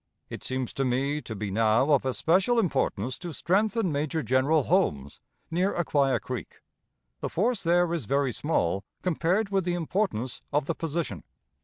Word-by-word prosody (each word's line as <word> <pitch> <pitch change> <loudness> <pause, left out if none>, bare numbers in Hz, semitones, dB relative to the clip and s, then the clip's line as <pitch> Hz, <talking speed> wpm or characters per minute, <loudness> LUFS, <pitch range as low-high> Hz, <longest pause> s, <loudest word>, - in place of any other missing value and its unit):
It - - -7
seems 130 -2 -2
to 135 - -1
me 135 +4 0
to 110 - -7
be 105 -1 -4
now 110 +7 +3
of 135 -2 +3
especial 185 - +2
importance 130 - 0
to 175 -2 -6
strengthen 205 +3 +1
Major 150 +2 -1
General 130 +5 +3
Holmes, 75 - 0 0.3
near 180 +4 +1
Acquia 145 -6 +2
Creek. 125 -2 -7 0.6
The - - -3
force 220 +4 +1
there 175 0 +2
is 160 -8 -2
very 140 +2 +1
small, 100 - 0 0.2
compared 185 +4 +1
with 195 -1 +1
the 175 0 -1
importance 165 - -2
of 145 0 +1
the - - -1
position. 160 - -3
150 Hz, 160 wpm, -27 LUFS, 130-175 Hz, 0.6 s, now